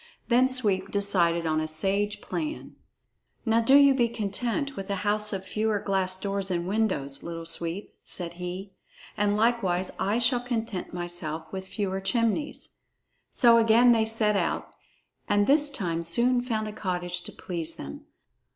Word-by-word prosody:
Then 255 +2 +4
Sweep 220 -7 0
decided 175 -5 +3
on 155 -1 +1
a 155 - -2
sage 195 +6 -1
plan. 310 -1 -5 0.7
"Now 225 0 +3
do 265 +4 +5
you 280 -1 +7
be 240 -3 +2
content 235 +6 -2
with 195 -2 -6
a 200 - 0
house 210 +1 +2
of 190 -2 -4
fewer 215 +2 0
glass 190 -2 0
doors 195 0 -3
and 175 -1 -2
windows, 185 -10 -1
Little 165 -1 -6
Sweep," 170 +4 -2
said 175 -2 -4
he, 185 +2 -6 0.4
"and 205 -1 +1
likewise 195 -6 +1
I 205 +3 +1
shall 240 +1 +2
content 230 -5 -4
myself 170 -3 -5
with 190 0 -5
fewer 195 -2 -3
chimneys." 230 +8 -1 0.5
So 235 -1 +6
again 230 +2 +5
they 225 -2 +3
set 220 -1 +1
out, - - -1 0.6
and 205 0 +3
this 290 +3 +4
time 175 -12 -2
soon 235 +9 +1
found 220 -3 -2
a 210 - -6
cottage 180 -3 -3
to - - -4
please 170 -2 -5
them. 70 +1 -9
205 Hz, 160 wpm, -27 LUFS, 180-230 Hz, 0.7 s, you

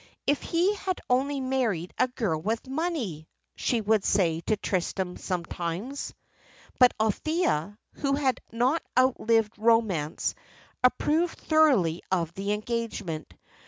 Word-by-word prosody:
"If 285 +1 +2
he 350 +5 +2
had 380 -2 -3
only 275 +3 +2
married 245 -10 -1
a - - +3
girl 210 -11 -2
with 225 - -2
money!" 265 - -3 0.3
she 235 -3 0
would 215 -1 +2
say 170 -5 +2
to 215 - +2
Tristram 185 -1 -2
sometimes. 180 +7 -4 0.6
But 250 -1 +6
Althea, 215 - 0 0.2
who 275 -1 -1
had 275 -3 +1
not 255 +8 +1 0.2
outlived 230 -4 +3
romance, 215 -9 +2 0.5
approved 315 +6 +2
thoroughly 260 - +3
of 170 -3 0
the 200 +2 -2
engagement. 210 -7 -4
225 Hz, 120 wpm, -27 LUFS, 185-270 Hz, 0.6 s, But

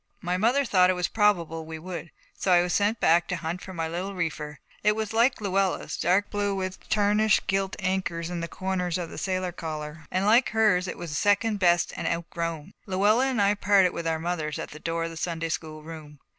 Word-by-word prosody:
My 180 0 -1
mother 240 +9 +2
thought 185 -5 +4
it - - +4
was 180 -1 -1
probable 170 -7 +1
we 160 0 -7
would. 170 +1 -7 0.2
So 190 - -1
I 175 -1 +6
was 175 -1 -2
sent 210 +2 +1
back 170 +1 +4
to 180 - -1
hunt 170 +2 -4
for 190 - -9
my 165 -3 -3
little 180 +4 -4
reefer. 150 -4 -3 0.2
It 210 +1 +3
was 220 0 -3
like 235 +4 +3
Luella's, 195 -2 0
dark 185 +4 +1
blue 205 -1 0
with 185 -1 -5
tarnished 210 +1 +3
gilt 195 0 0
anchors 185 -3 -2
on 175 - -3
the 170 - -3
corners 180 -1 -2
of 175 -2 -5
the - - -6
sailor 185 -1 -1
collar, 155 -2 -6
and 185 +1 0
like 230 +4 +5
hers 210 -4 +3
it - - -5
was 165 -4 -5
second 205 +4 +2
best 175 -2 +3
and - - -3
outgrown. 170 0 -3
Luella 205 +7 +3
and 260 -4 -1
I 200 0 +4
parted 200 -3 +3
with 170 -1 -4
our 160 -1 +1
mothers 160 -2 -3
at - - -6
the 155 - -10
door 165 +1 -2
of 165 - -3
the 165 - -9
Sunday 165 0 -2
school 155 -1 -5
room. 155 -2 -10
180 Hz, 220 wpm, -26 LUFS, 165-200 Hz, 0.2 s, I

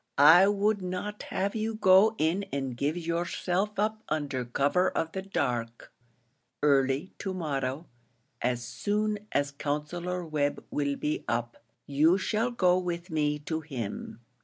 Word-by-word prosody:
I 165 +7 +8
would 205 0 +1
not 185 +3 -4
have 195 +1 -1
you 220 0 -2
go 205 +1 +5
in 165 +5 +1
and 135 -3 -3
give 145 +6 -1
yourself 175 +4 -1
up 215 +1 0
under 145 -4 -1
cover 140 +9 +2
of 165 - -2
the 190 - -4
dark. 120 -11 -3 0.7
Early 140 +4 +2
to 190 -2 -3
morrow 140 -3 -2 0.6
as 120 0 0
soon 210 - -1
as 140 0 +1
Counsellor 170 +5 -3
Webb 150 -2 -1
will 140 -1 0
be 150 +2 -2
up, 120 0 -2 0.3
you 155 +6 +4
shall 220 +4 0
go 185 -6 +3
with 175 0 -4
me 150 -1 +1
to 160 -1 -1
him. 120 -6 -6
165 Hz, 140 wpm, -29 LUFS, 140-190 Hz, 0.7 s, I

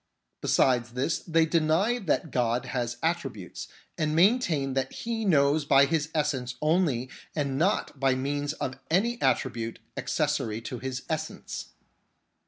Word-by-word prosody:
Besides 120 -2 +2
this, 130 +6 0
they 165 -1 +2
deny 165 +9 +2
that 165 - -1
God 120 0 +1
has 120 -2 -2
attributes, 135 - -3 0.3
and 155 -1 +1
maintain 170 - +3
that 135 0 -1
He 230 -1 -3
knows 145 -4 +4
by 140 -1 +6
His 155 +1 0
essence 135 -5 -1
only 150 -6 +1 0.3
and 140 -3 -1
not 170 -5 0
by 135 -1 +3
means 145 +2 -2
of 135 -3 -4
any 230 +8 +1
attribute 115 -3 0 0.2
accessory 110 0 -1
to 125 +1 -6
His 130 0 -4
essence. 155 0 -5
145 Hz, 135 wpm, -28 LUFS, 130-165 Hz, 0.3 s, by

